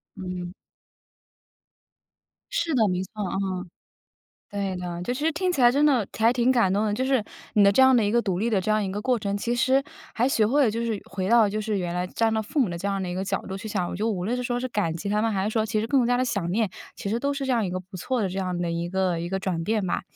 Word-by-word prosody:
嗯。 180 -2 -6 2.0
是 340 -10 0
的， 225 -4 +4
没 180 -1 0
错， 190 - -12
嗯。 190 -1 -3 0.8
对 200 -2 -3
的， 175 -1 -5
就 210 - -2
其 260 +4 -4
实 325 - +2
听 365 +4 0
起 280 - -1
来 240 -1 +7
真 285 +3 +3
的 260 -9 +3
还 225 +4 +2
挺 250 +1 +3
感 230 -7 +3
动 205 +2 +1
的， 205 - 0
就 255 - -1
是， 260 -3 +2 0.3
你 205 - +6
的 200 - +7
这 265 - +5
样 260 0 +7
的 235 - +4
一 205 - 0
个 235 0 +3
独 190 -5 -1
立 225 +4 0
的 210 -4 +2
这 190 - -2
样 215 0 +2
一 195 - -2
个 205 +1 -4
过 255 0 +2
程， 200 -2 -2
其 235 +4 -1
实 260 +3 +3 0.3
还 240 - +2
学 225 -5 +3
会 285 +6 +3
了 230 - +3
就 230 +2 -2
是 225 -3 -1
回 190 -1 -2
到 235 +1 +6
了 205 - +2
就 215 +1 -2
是 210 -1 -1
原 175 -2 -2
来 180 +1 -1
站 225 +4 0
到 220 - +1
父 225 +7 -2
母 245 - +3
的 170 -1 -4
这 195 - -4
样 195 -1 -1
的 185 - -3
一 - - -3
个 185 +2 -2
角 195 0 -2
度 190 - -4
去 220 - -8
想。 180 -4 -1
我 - - -5
觉 210 - -2
得 - - +2
无 180 -4 -2
论 235 +6 0
是 250 - -2
说 245 -1 -1
是 255 - -3
感 205 -8 -1
激 185 +5 -4
他 210 +1 +1
们， 225 0 +1
还 190 -2 0
是 210 - 0
说 220 -1 0
其 215 -1 0
实 220 - -2
更 260 -2 +3
加 245 +1 +2
地 255 - +1
想 200 -8 -1
念， 215 -1 +1 0.2
其 200 - -5
实 225 - 0
都 280 +3 -1
是 275 -1 -3
这 265 - -1
样 230 -4 +1
一 - - -3
个 185 +1 -3
不 185 +1 -11
错 245 +6 -1
的 195 - 0
这 185 +2 -4
样 185 -2 -2
的 175 -1 -1
一 170 +1 -2
个 185 -2 0
一 170 +1 -4
个 190 +1 -1
转 180 -4 -2
变 215 +1 0
吧。 175 - -1
210 Hz, 330 characters per minute, -25 LUFS, 190-240 Hz, 2.0 s, 来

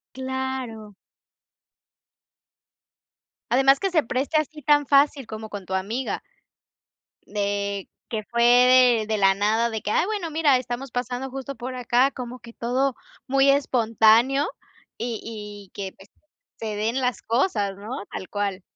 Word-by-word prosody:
¡Claro! 260 -5 -4 2.5
Además 270 +2 +5
que 390 -2 -1
se 315 -4 +3
preste 265 +6 -1
así 305 0 -2
tan 290 0 +3
fácil 280 -3 +3
como 220 0 -7
con 200 -2 -7
tu 190 - -6
amiga, 220 +8 -3 1.0
de 200 -1 -2 0.2
que 220 -2 -3
fue 235 +2 -1
de 245 -1 +6
de 215 0 -1
la 195 -1 +5
nada 215 +4 +1
de 220 -2 -4
que: 210 - -3
"Ay, 320 - +2
bueno, 405 -6 -3
mira, 300 -3 +3
estamos 250 +1 -4
pasando 250 +2 -3
justo 270 +1 -6
por 255 +1 -6
acá", 250 +2 +2
como 250 -1 -7
que 235 -1 -13
todo 255 +2 0 0.3
muy 275 +1 +4
espontáneo 245 0 +3 0.5
y 235 -2 -4
y 210 -3 -9
que, 195 -2 -5
pues, 195 - -18 0.5
se 220 -2 -4
den 225 +5 -1
las 250 -1 -1
cosas, 220 - 0
¿no?, 210 +2 -6
tal 185 - -6
cual. 200 -2 -2
240 Hz, 145 wpm, -24 LUFS, 215-265 Hz, 2.5 s, de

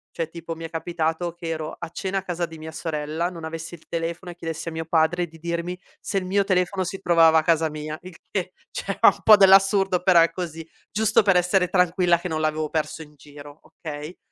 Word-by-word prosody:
Cioè, 165 -1 -2
tipo, 165 0 -7
mi 165 - -9
è 165 - -5
capitato 165 0 -2
che 170 -1 -7
ero 155 -1 -4
a - - -6
cena 190 +3 -3
a 190 - -10
casa 175 -2 -2
di 165 -1 -11
mia 160 0 -8
sorella, 160 +1 -3
non 170 -3 -10
avessi 160 +1 -6
il 165 - -12
telefono 170 +1 -4
e - - -12
chiedessi 165 -1 -5
a - - -8
mio 160 0 -4
padre 170 +2 +1
di 165 0 -16
dirmi 170 +2 -3 0.2
se 200 - -3
il 185 - -7
mio 200 +2 +1
telefono 185 0 0
si 190 +2 -5
trovava 165 -3 +5
a - - -2
casa 160 -1 +2
mia 155 0 -6
il 185 -1 -11 0.2
che, 185 -2 -2 0.2
cioè, - - -4
ha - - +9
un - - -6
po' 215 - +9
dell'assurdo, 195 -1 +5
però 180 -2 +6
è 165 -1 +3
così; 165 -2 -6 0.2
giusto 215 0 +3
per 195 -3 +3
essere 180 +1 +3
tranquilla 180 -1 +3
che 175 +2 -6
non 160 -1 -2
l'avevo 155 0 -1
perso 160 +1 -2
in 150 -1 -13
giro, 145 +1 -13
okay? 150 +2 -8
170 Hz, 230 wpm, -24 LUFS, 160-180 Hz, 0.2 s, ha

